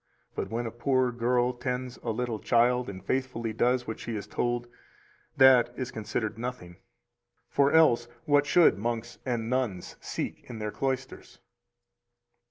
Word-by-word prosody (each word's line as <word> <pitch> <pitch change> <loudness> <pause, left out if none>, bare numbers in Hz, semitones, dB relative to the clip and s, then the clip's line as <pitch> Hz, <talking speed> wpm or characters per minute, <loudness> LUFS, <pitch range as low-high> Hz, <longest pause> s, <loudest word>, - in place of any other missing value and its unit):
But - - -4
when 120 +2 -2
a 115 - -4
poor 130 +1 +1
girl 120 +1 +1
tends 125 0 -4
a 120 - -6
little 115 -1 -2
child 120 +1 +2
and 95 -1 -9
faithfully 125 -4 -2
does 125 +2 +1
what 110 - -5
she 115 - -5
is 105 -1 -4
told, 120 +3 -1 0.7
that 130 -3 +7
is 130 -2 -4
considered 110 0 -3
nothing; 115 -8 -6 0.7
for 140 0 +3
else 120 -8 +5 0.2
what 145 -1 +3
should 165 - +5
monks 120 +1 -3
and 120 -3 -1
nuns 120 -8 -2
seek - - -5
in 120 - -6
their 105 -1 -3
cloisters? 130 +1 -4
120 Hz, 150 wpm, -28 LUFS, 115-130 Hz, 0.7 s, that